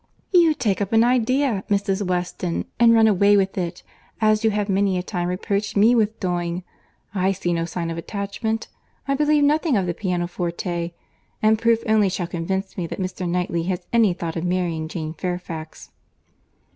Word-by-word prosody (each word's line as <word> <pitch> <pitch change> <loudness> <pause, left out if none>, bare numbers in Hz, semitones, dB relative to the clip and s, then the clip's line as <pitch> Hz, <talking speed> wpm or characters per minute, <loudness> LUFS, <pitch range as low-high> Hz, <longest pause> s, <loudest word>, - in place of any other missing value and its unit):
"You 340 -4 +5
take 205 -7 0
up 200 +2 -2
an 225 0 +6
idea, 250 -2 +2
Mrs. 200 -1 +1
Weston, 180 -2 -2
and 235 -1 +7
run 225 -1 +6
away 205 0 +4
with 195 -1 +1
it; 175 -2 -4 0.4
as 215 0 +3
you 220 - +4
have 210 -1 -1
many 195 -1 +1
a 180 - -2
time 180 -2 -3
reproached 200 +3 -2
me 220 +4 +6
with 220 -2 +1
doing. 175 -1 -2 0.5
I 190 -1 +1
see 175 -2 -2
no 165 0 0
sign 170 0 -4
of 165 - -4
attachment—I 220 +7 -4
believe 295 +1 +3
nothing 300 -2 +3
of 190 - 0
the 175 - -1
pianoforte—and 175 +3 -2
proof 230 -1 +3
only 215 -3 +3
shall 185 -1 -2
convince 190 +3 -3
me 170 - -2
that - - -6
Mr. 185 -1 -3
Knightley 175 -1 -1
has 180 -1 -3
any 225 -5 +4
thought 170 -2 -5
of 165 - -3
marrying 175 -3 -1
Jane 160 -1 -5
Fairfax." 170 -2 -6
190 Hz, 170 wpm, -22 LUFS, 175-220 Hz, 0.5 s, and